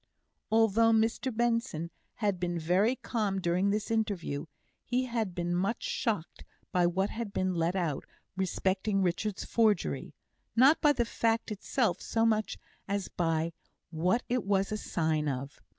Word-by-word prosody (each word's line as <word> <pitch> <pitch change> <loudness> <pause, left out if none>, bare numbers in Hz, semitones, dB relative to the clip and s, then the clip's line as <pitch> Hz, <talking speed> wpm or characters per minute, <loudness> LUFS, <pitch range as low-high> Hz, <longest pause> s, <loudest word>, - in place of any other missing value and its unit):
Although 225 0 +4
Mr 225 +4 +1
Benson 230 -8 0 0.2
had 205 -5 0
been 175 -1 -1
very 185 +9 +2
calm 210 -7 -1
during 180 +2 +1
this 210 +2 -1
interview, 200 -10 -1 0.4
he 250 +1 0
had 225 -7 -2
been 175 0 -1
much 195 +6 0
shocked 225 - -2 0.3
by 180 -1 +3
what 190 +3 0
had 225 -2 -4
been 185 -1 0
let 170 +1 0
out 165 -7 -1 0.3
respecting 190 +1 0
Richard's 185 +3 -1
forgery; 220 -3 +1 0.4
not 265 +7 +6
by 295 - +6
the 245 -4 +1
fact 230 0 0
itself 210 -2 0
so 225 0 +1
much 215 -1 +1 0.3
as 200 -1 -2
by 165 -1 0 0.4
what 180 +9 +1
it 245 -2 0
was 195 0 +1
a 215 - -1
sign 160 -6 0
of. 135 +1 -5
200 Hz, 150 wpm, -30 LUFS, 175-225 Hz, 0.4 s, not